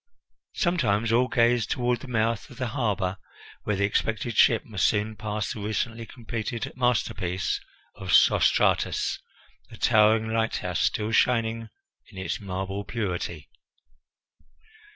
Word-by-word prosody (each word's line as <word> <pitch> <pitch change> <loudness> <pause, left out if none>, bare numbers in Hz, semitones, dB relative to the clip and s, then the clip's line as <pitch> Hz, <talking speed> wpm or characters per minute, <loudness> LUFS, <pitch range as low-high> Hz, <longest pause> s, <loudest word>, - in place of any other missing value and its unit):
Sometimes 115 - +1
all 125 +2 +3
gazed 120 -2 +2
toward 125 -2 0
the 140 - -10
mouth 115 -3 -1
of - - -13
the 130 -2 -2
harbour, 105 -7 -1 0.5
where 105 - 0
the 100 - 0
expected 110 +2 -1
ship 115 0 +4
must 105 -5 +1
soon 110 +1 0
pass 105 -1 -3
the - - -8
recently 115 +2 -3
completed 115 -1 -5
masterpiece 105 -7 0 0.4
of - - -8
Sostratus, - - +3 0.5
the - - -12
towering 110 +1 +4
lighthouse, 115 0 -1
still 105 +1 0
shining 115 -1 +1 0.4
in - - -15
its 95 - -3
marble 95 0 -4
purity. 90 - -4
110 Hz, 125 wpm, -26 LUFS, 100-115 Hz, 0.5 s, ship